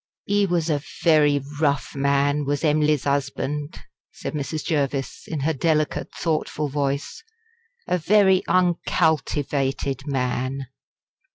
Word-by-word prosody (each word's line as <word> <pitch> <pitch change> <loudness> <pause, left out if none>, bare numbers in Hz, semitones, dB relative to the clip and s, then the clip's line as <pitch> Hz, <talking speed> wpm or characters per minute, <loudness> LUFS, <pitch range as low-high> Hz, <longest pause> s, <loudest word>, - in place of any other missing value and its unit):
"He 205 0 +2
was 170 -2 0
a 150 -3 0 0.2
very 150 -4 +4 0.2
rough 145 -3 +1
man 140 +1 +2
was 145 +2 -1
Em'ly's 150 -2 +2
husband," 145 +1 -2 0.3
said - - -6
Mrs. 150 +1 -3
Jervis, 140 -4 -2
in 155 -3 -3
her 160 +4 +1
delicate 155 +1 0
thoughtful 155 -2 -2
voice 140 0 -2 0.6
"a 180 - +1
very 190 +1 +4
uncultivated 145 -6 0
man." 130 0 -1
145 Hz, 110 wpm, -23 LUFS, 140-160 Hz, 0.6 s, very